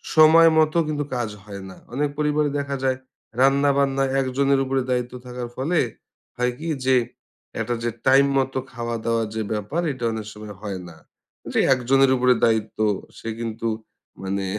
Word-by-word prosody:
সময় 160 +1 +8
মতো 155 +1 +3
কিন্তু 150 -1 -1
কাজ 120 -3 -1
হয় 100 -2 -8
না। 95 - -12 0.2
অনেক 145 +2 0
পরিবারে 150 0 +1
দেখা 140 -1 -3
যায়, 130 -1 +1 0.4
রান্না-বান্না 135 0 +3 0.2
১ 135 - +1
জনের 140 -1 +3
উপরে 135 0 0
দায়িত্ব 125 0 -1
থাকার 125 -1 -6
ফলে, 160 +6 0 0.6
হয় 125 0 +1
কি 165 - -5 0.2
যে, 130 0 +4 0.6
একটা 120 - -1
যে 120 - +1 0.2
টাইম 135 +1 +6
মতো 135 0 0
খাওয়া-দাওয়া 115 -1 -1
যে 110 - -1
ব্যাপার, 110 - -2
এটা 130 -2 -7
অনেক 110 -1 -5
সময় 105 -1 -9
হয় 100 -3 -4
না। 80 - -13 0.6
যে - - +2
১ 130 - -1
জনের 135 -1 +5
উপরে 125 0 +4
দায়িত্ব, 110 -1 0 0.4
সে 115 - -6
কিন্তু 115 0 -3 0.5
মানে 95 0 -2
130 Hz, 165 wpm, -23 LUFS, 115-140 Hz, 0.6 s, সময়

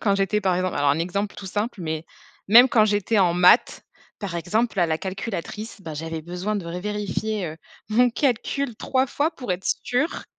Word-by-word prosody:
quand 200 -2 +2
j'étais, 195 +1 +1
par 190 -2 +1
exemple 185 0 -1
alors 145 0 +3
un 145 - +1
exemple 200 +5 -2
tout 195 - -8
simple, 210 +2 -3
mais, 160 -1 -3 0.4
même 240 +5 +8
quand 220 -4 +4
j'étais 205 +1 +1
en 175 -3 +3
maths, 180 +6 +4 0.4
par 195 -5 -5
exemple, 210 +5 -1
à 175 - +4
la 160 -1 0
calculatrice, 200 +2 -5
ben, 165 -4 -7
j'avais 160 +1 -5
besoin 180 +5 -3
de 195 - -4
revérifier, 210 +2 -3
heu, 155 0 -7 0.3
mon 245 +3 +4
calcul 250 0 -1
3 260 +3 0
fois 295 +5 0
pour 250 -11 -4
être 180 +2 -5 0.2
sûre, 285 +7 -1
200 Hz, 190 wpm, -24 LUFS, 175-220 Hz, 0.4 s, même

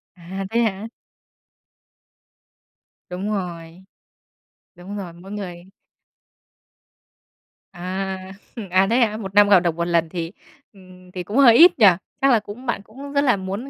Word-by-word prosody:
À, 185 +3 -7
thế 230 +2 +1
hả? 215 -1 -2 2.2
Đúng 185 +4 -4
rồi. 175 -2 -6 0.9
Đúng 185 +3 -9
rồi, 185 -4 -7
mỗi 180 +4 -12
người 180 -4 -7 2.1
À, 190 +1 -5 0.4
à, 190 +2 +3
thế 235 - +2
hả? 215 -3 +1
Một 195 -3 -8
năm 205 0 +6
gặp 195 -3 +7
được 170 -2 -1
1 170 0 -2
lần 170 -2 +1
thì, 170 -1 -5 0.4
ưm, 185 -1 -17
thì 180 -1 -6
cũng 210 +8 -4
hơi 245 -5 +7
ít 335 -1 +7
nhỉ? 215 - +7 0.4
Chắc 275 0 +4
là 230 - +4
cũng 210 +5 -11
bạn 235 -4 -2
cũng 270 +8 -11
rất 280 - +2
là 245 -7 +3
muốn 195 +8 -6
195 Hz, 150 wpm, -21 LUFS, 180-215 Hz, 2.2 s, gặp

